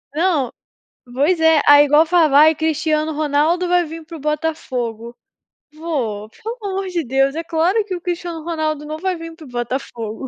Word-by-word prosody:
Não, 315 -7 +1 0.6
pois 295 +8 +2
é. 320 -1 +4
aí 290 0 +8
igual 300 +3 +4
falava: 315 -4 +4
"Ai, 310 +2 +7
Cristiano 315 0 0
Ronaldo 310 +4 +1
vai 355 0 +3
vim 325 +1 -8
para 330 +1 -10
o - - -11
Botafogo", 255 -7 -3 0.6
vô, 255 -10 -4
pelo 450 - -7
amor 390 -1 -3
de 350 -2 -2
Deus, 270 +2 +1
é 330 - -3
claro 340 +6 +1
que 395 - -5
o 350 - -7
Cristiano 345 -2 -4
Ronaldo 310 -2 -2
não 305 +1 -5
vai 370 +3 -2
vim 330 -1 -9
para 320 -1 -13
Botafogo, 240 -2 -5
315 Hz, 175 wpm, -19 LUFS, 285-335 Hz, 0.6 s, aí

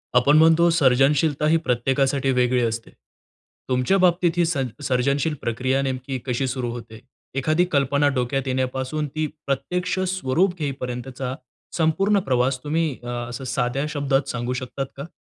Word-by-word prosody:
आपण 140 +5 +5
म्हणतो 165 +2 +5
सर्जनशीलता 145 0 +3
ही 165 +1 +4
प्रत्येकासाठी 135 -1 +1
वेगळी 125 -1 +2
असते. 115 0 -3 0.8
तुमच्या 130 +9 +2
बाबतीत 180 -2 +3
ही 175 - +4
सन 140 -6 -1 0.2
सर्जनशील 140 +4 +1
प्रक्रिया 130 +4 0
नेमकी 130 0 -3
कशी 130 +1 -1
सुरू 125 -1 -2
होते? 115 -2 -9 0.4
एखादी 155 +6 +2
कल्पना 140 -1 +2
डोक्यात 130 +2 -1
येण्यापासून 130 +3 -1
ती 155 +3 -2 0.2
प्रत्यक्ष 180 +7 -1
स्वरूप 180 +1 0
घेईपर्यंतचा 130 -2 -4 0.4
संपूर्ण 195 +6 +2
प्रवास 130 -4 0
तुम्ही 160 +2 0
अ, - - -8
असं 120 +1 -5
साध्या 130 +2 -1
शब्दात 140 -2 0
सांगू 120 +1 -2
शकता 130 +2 -4
का? 140 +3 -6
135 Hz, 140 wpm, -23 LUFS, 125-155 Hz, 0.8 s, आपण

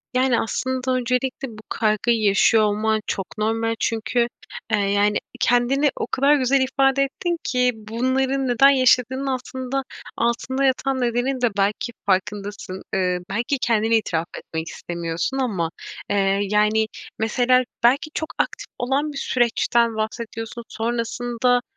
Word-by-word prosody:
Yani, 255 -2 +3
aslında 260 +2 -2
öncelikle 255 +2 -1
bu 220 -3 -11
kaygıyı 220 +1 +1
yaşıyor 210 +2 +4
olman 215 +1 +1
çok 195 +2 -4
normal. 225 +1 0
Çünkü, 235 +1 0 0.4
eee, 215 - +3
yani, 205 +1 +2 0.2
kendini 260 +4 +3
o - - -3
kadar 280 +3 +3
güzel 270 0 +2
ifade 270 +1 +2
ettin 340 +5 -2
ki 250 -2 +2
bunların 260 +5 -1
neden 250 +3 +6
yaşadığının 260 0 +3
altında 260 +1 -3 0.3
altında 240 +3 0
yatan 265 0 +1
nedenin 245 +2 0
de 245 - +3
belki 205 +4 0
farkındasın, 195 0 -2
ııı, 180 -1 +1
belki 235 +7 -1
kendine 225 -1 +2
itiraf 170 -6 -2
etmek 160 0 -5
istemiyorsun. 170 +9 -3
Ama, 195 -11 -1 0.4
eee, 195 -1 +2
yani, 210 +2 +2 0.3
mesela 250 +3 +3 0.2
belki 270 +6 +3
çok 315 - -3
aktif - - -2
olan 275 +5 0
bir - - -7
süreçten 235 -2 +1
bahsediyorsun. 225 +1 -4
Sonrasında, 240 +2 0
235 Hz, 130 wpm, -22 LUFS, 215-260 Hz, 0.4 s, neden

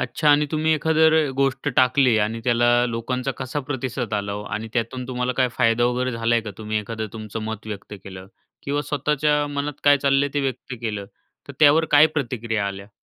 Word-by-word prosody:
अच्छा 150 - 0
आणि 145 +1 +4
तुम्ही 155 0 +1
एखादी 160 +1 0
जर 160 -2 +5
गोष्ट 135 +1 0
टाकली 130 -2 +4
आणि 115 +2 -4
त्याला 120 0 +3 0.2
लोकांचा 125 +3 -3
कसा 130 +2 -3
प्रतिसाद 125 -4 -3
आला 100 0 -2
ओ 105 - -5
आणि 110 +1 -6
त्यातून 125 +1 -3
तुम्हाला 125 0 -1
काय 130 -1 +3
फायदा 115 -1 +3
वगैरे 125 +1 0
झाला 115 +1 0
आहे 115 - +2
का? 105 - -6
तुम्ही 110 0 -2
एखादा 110 +1 -5
तुमचं 110 0 -6
मत 110 -1 -6
व्यक्त 105 0 -7
केलं 95 -1 -9 0.4
किंवा 145 +1 -1
स्वतःच्या 150 +1 0
मनात 145 0 -4
काय 145 0 +6
चाललं 135 0 +2
आहे 145 - -10
ते 145 - +1
व्यक्त 130 -1 -4
केलं 105 -4 -4 0.4
तर - - -7
त्यावर 155 +2 +6
काय 150 +1 +7
प्रतिक्रिया 115 -8 -2
आल्या? 100 +1 -7
125 Hz, 200 wpm, -22 LUFS, 110-145 Hz, 0.4 s, काय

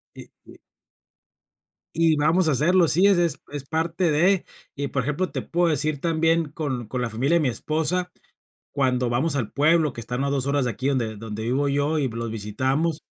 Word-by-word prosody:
Y - - -11 0.2
y - - -15 1.4
y 165 -1 +3
vamos 160 +4 +2
a - - +3
hacerlo. 170 +6 +3
Sí, 180 +6 +4
es 200 -2 +4
es 170 -4 +1
es 145 -2 -5
parte 165 +3 0
de. 175 +5 +3 0.3
Y 140 0 -3
por 130 -3 -1
ejemplo, 150 +7 -2
te - - -3
puedo 175 0 0
decir 150 -1 -1
también, 165 -1 +1
con 135 -7 -4
con 125 +3 -3
la 120 - -1
familia 135 +10 +1
de - - +1
mi 145 - +1
esposa, 160 +8 -1 0.6
cuando 125 -3 0
vamos 135 +6 0
al 120 -6 -2
pueblo, 155 0 +2
que 115 - -7
están 125 +4 -3
a 140 - 0
2 140 -2 -1
horas 140 -1 +1
de 120 - 0
aquí, 130 +5 -3
donde 120 -5 -1
donde 110 0 -6
vivo 130 +5 0
yo, 145 +3 0
y 140 - 0
los 115 0 -4
visitamos. 130 +9 -1
145 Hz, 200 wpm, -24 LUFS, 125-165 Hz, 1.4 s, Sí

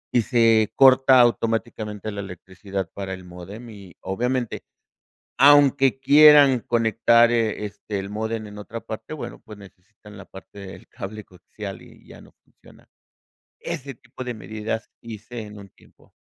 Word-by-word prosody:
y 120 - +5
se 115 -2 +2
corta 130 -1 +6
automáticamente 110 -3 -1
la 100 -1 -6
electricidad 95 +1 -7
para 95 -1 -6
el 95 - -13
módem, 90 +7 -11
y 100 -4 -14
obviamente, 120 +4 -3 0.8
aunque 140 -1 +5
quieran 145 -3 +6
conectar, 115 +1 +3
eh, 110 -3 -1
este, 105 0 -6
el 95 - -7
módem 110 +1 -4
en 105 0 -12
otra 105 +2 -8
parte, 110 +6 -8
bueno, 155 - -8
pues, 105 -1 -13
necesitan 100 +1 -17
la 100 - -10
parte 95 +2 -14
del 95 -1 -11
cable 105 +2 -8
coaxial, 95 +2 -10
y - - -18
ya - - -14
no - - -18
funciona. - - -22 0.7
Ese 140 0 -6
tipo 130 +1 -11
de 125 -1 -5
medidas 110 +2 -6
hice 115 +1 -9
en 105 0 -12
un 100 -1 -13
tiempo. - - -26
110 Hz, 150 wpm, -22 LUFS, 100-120 Hz, 0.8 s, corta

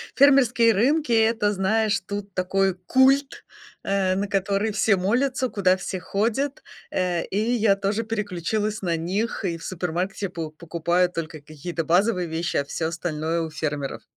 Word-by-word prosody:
фермерские 250 -5 +5
рынки- 280 +6 +2
это, 220 -2 +3
знаешь, 205 +1 +1
тут 200 -1 -6
такой 190 +1 +1
культ, 270 +2 +3 0.4
э, 195 -1 +1
на 200 +2 -1
который 200 +2 0
все 205 -1 +3
молятся, 255 +7 +1
куда 185 -3 +2
все 185 0 -4
ходят. 235 +10 -1 0.3
Э, 180 -2 0
и 200 - -2
я 220 -4 +3
тоже 200 +3 -1
переключилась 210 0 -2
на 170 -3 0
них. 200 +7 -2
И 170 -2 -1
в 165 - -13
супермаркете 185 +2 -3
по 165 -3 -5
покупаю 170 +2 0
только 165 -2 -5
какие-то 155 +3 -5
базовые 180 +1 +2
вещи, 165 +2 -2
а 140 - 0
всё 160 +3 -2
остальное- 165 -1 -2
у 160 - -3
фермеров. 150 -3 -4
195 Hz, 155 wpm, -24 LUFS, 170-220 Hz, 0.4 s, фермерские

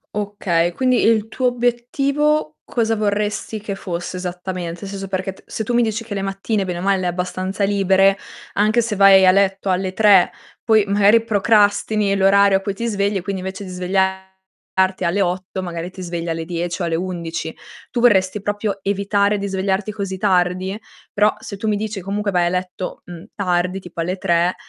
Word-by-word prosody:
Okay, 190 -5 0
quindi 255 +3 +2
il 220 -1 +2
tuo 255 +3 0
obiettivo 245 - 0
cosa 225 -2 0
vorresti 210 +1 -2
che 205 -2 -4
fosse 175 -1 -5
esattamente? 180 -1 -5
Senso, 195 0 -6
perché 190 0 -2
t 190 - -17
se 220 - -4
tu 240 - -3
mi 240 - +4
dici 225 0 -1
che 225 -2 -7
le 200 - -2
mattine 195 +1 -2
bene 180 -2 -4
o - - -5
male 195 +1 +2
le 185 - -3
hai 175 - +1
abbastanza 185 +2 -3
libere, 195 -1 +3 0.4
anche 215 +3 +3
se 225 -3 -3
vai 195 -1 +7
a 185 - +7
letto 195 0 +1
alle 185 0 0
3, 200 -3 +5 0.3
poi 220 -2 +5
magari 205 +3 +4
procrastini 210 -1 +2
l'orario 195 0 +5
a - - -6
cui 200 0 -3
ti 230 +4 -5
svegli 200 -2 0
e, - - -3
quindi, 190 +1 -4
invece 190 +2 -6
di 190 - -8
svegliarti 190 0 -2
alle 185 +4 +1
8, 185 +1 -2
magari 170 -1 -5
ti 185 - -10
svegli 170 -1 -4
alle 165 0 -2
10 175 +2 -3
o - - 0
alle 165 -1 -1
11. 170 -2 -4 0.3
Tu 240 - -2
vorresti 200 -4 +3
proprio 205 0 -2
evitare 200 +1 +1
di 200 0 -3
svegliarti 195 +2 -1
così 195 -3 -4
tardi? 185 0 +1 0.4
Però 210 +1 +3
se 210 - -7
tu 215 +2 -2
mi 210 - +1
dici 210 -1 -4
comunque 200 +2 -2
vai 175 -2 +2
a - - +1
letto, 180 0 -4
mhmm, 175 +2 -10
tardi, 180 -1 0
tipo 175 -2 -7
alle 180 +3 -2
3, 175 -1 +1
195 Hz, 190 wpm, -20 LUFS, 185-210 Hz, 0.4 s, vai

